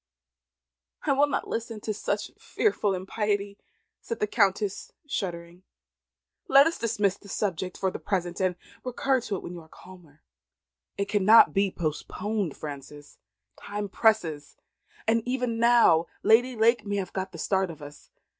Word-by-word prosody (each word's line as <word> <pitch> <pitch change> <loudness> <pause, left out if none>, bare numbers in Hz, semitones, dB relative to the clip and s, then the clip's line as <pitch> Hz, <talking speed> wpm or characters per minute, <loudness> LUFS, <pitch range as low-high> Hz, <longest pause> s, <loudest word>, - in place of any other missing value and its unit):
"I - - +1
will 285 +2 +4
not - - -2
listen 225 -1 -4
to 215 - -2
such 210 0 -3
fearful 210 - 0
impiety," 200 +1 -2 0.4
said 230 - -5
the - - +2
Countess, 200 -2 0
shuddering. 175 -8 -5 0.9
"Let 275 +1 +7
us 330 +1 -1
dismiss 210 -4 0
this 200 - -9
subject 185 -3 -2
for 190 - 0
the - - -6
present, 180 -2 -2
and 185 -1 +1 0.3
recur 255 +1 0
to 215 -3 -3
it - - -6
when 175 - -7
you 175 - -8
are 160 - -18
calmer." 170 -5 -16 0.7
"It 200 - 0
cannot 210 +2 +6
be 195 0 +2
postponed, 185 +3 -3
Frances. 145 0 -9 0.4
Time 205 0 -5
presses, 180 -10 +1 0.5
and 230 +1 +3
even 250 -2 -1
now 230 -9 +5 0.2
Lady 245 +3 +4
Lake 230 0 +3
may 205 -1 -3
have 190 -3 -3
got 190 0 -3
the 170 - -10
start 190 +2 0
of 155 -3 -10
us. 145 0 -12
200 Hz, 155 wpm, -27 LUFS, 180-225 Hz, 0.9 s, Let